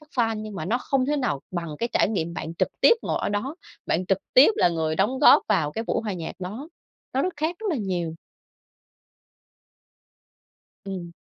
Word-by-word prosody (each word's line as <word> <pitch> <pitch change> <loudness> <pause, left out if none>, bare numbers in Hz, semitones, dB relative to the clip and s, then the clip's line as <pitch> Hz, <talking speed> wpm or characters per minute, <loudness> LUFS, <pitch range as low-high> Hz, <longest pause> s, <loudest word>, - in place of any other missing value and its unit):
các 305 - -20
fan, 225 -2 +2
nhưng 215 -1 -7
mà 185 - -4
nó 225 +8 0
không 260 0 0
thể 295 +1 +1
nào 245 - -1
bằng 170 -4 -4
cái 235 - -1
trải - - +3
nghiệm 170 -5 -2
bạn 165 +1 -5
trực - - +2
tiếp - - +7
ngồi - - -1
ở - - 0
đó, 205 +8 -2 0.3
bạn 180 +3 0
trực 195 0 +2 0.2
tiếp 265 +10 +8
là - - +4
người 160 -2 -1
đóng 220 +7 +1
góp 290 - +7
vào 150 -2 +2
cái 225 - -3
buổi - - 0
hòa 210 -3 -3
nhạc 170 -3 -5
đó. 210 - -6 0.5
Nó 265 - +2
rất 370 - -1
khác 315 +4 -1
rất 445 - -5
là 315 - 0
nhiều. 180 -7 -2 2.7
Ừm. 180 -3 -6
205 Hz, 205 wpm, -25 LUFS, 170-260 Hz, 2.7 s, tiếp